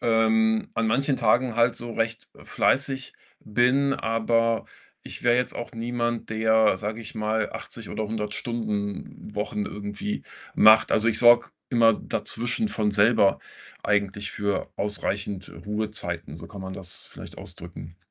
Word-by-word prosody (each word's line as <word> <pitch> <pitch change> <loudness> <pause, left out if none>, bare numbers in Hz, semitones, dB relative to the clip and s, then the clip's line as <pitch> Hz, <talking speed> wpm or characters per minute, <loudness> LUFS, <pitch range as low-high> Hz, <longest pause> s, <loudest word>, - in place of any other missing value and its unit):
ähm, 220 - +3
an 115 - +1
manchen 135 +4 +2
Tagen 120 +1 +2
halt 115 0 +4
so 120 - -6
recht 115 0 -2
fleißig 135 -1 0 0.3
bin, 130 +5 +2
aber 115 0 +1 0.4
ich - - -8
wäre 120 0 +4
jetzt 125 0 0
auch 120 - -6
niemand, 120 0 -2
der, 110 -2 +3
sage 110 +3 -4
ich 110 - -8
mal, 110 0 -1
80 - - -6
oder 110 +1 -3
100 105 -1 -3
Stunden-Wochen 105 -1 -3
irgendwie 105 0 -5 0.3
macht. 110 +1 +7
Also, 110 +2 +3
ich 110 -1 +2
sorge 120 0 +6 0.2
immer 115 -2 +5
dazwischen 120 - -2
von 105 - 0
selber 100 0 +4 0.4
eigentlich 100 0 0
für 100 -1 -1
ausreichend 100 -1 -3 0.2
Ruhezeiten, 105 -8 -3
so 85 +1 -10
kann 100 - -10
man 95 0 -6
das 95 -1 -7
vielleicht - - -11
ausdrücken. 85 -1 -9
110 Hz, 140 wpm, -25 LUFS, 105-120 Hz, 0.4 s, macht